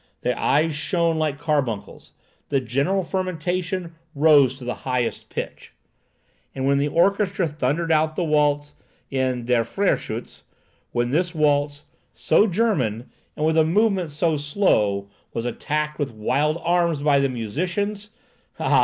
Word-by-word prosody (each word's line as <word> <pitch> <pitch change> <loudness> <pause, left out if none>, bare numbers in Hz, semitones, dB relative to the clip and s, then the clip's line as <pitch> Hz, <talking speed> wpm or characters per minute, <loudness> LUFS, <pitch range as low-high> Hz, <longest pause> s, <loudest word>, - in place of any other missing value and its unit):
The 125 0 0
eyes 155 +3 +2
shone 165 +3 0
like 155 -3 0
carbuncles. 135 -9 -2 0.4
The 140 - +2
general 140 - 0
fermentation 180 0 -2 0.2
rose 140 -3 +5
to 130 - -10
the 125 - -2
highest 125 -2 -2
pitch. - - -6 0.8
And 135 0 -2
when 140 0 +3
the 145 - +1
orchestra 190 +3 +2
thundered 150 +3 -1
out 155 0 +2
the 180 - 0
waltz 145 -2 +1 0.4
in 130 -3 -1
"Der 120 -1 +2
Freyschütz,"—when 120 - -3
this 175 +4 0
waltz, 145 -1 +1 0.3
so 155 - +3
German, 160 - 0 0.3
and 150 - 0
with 160 +1 +3
a - - +6
movement 190 +1 +2
so 155 +2 0
slow, 110 - +1 0.3
was 115 - -2
attacked 150 +5 -2
with 145 -3 -1
wild 140 +9 0
arms 170 -4 +1
by 145 -2 +4
the 140 0 +2
musicians,—ah! 195 - -2
150 Hz, 135 wpm, -23 LUFS, 135-170 Hz, 0.8 s, a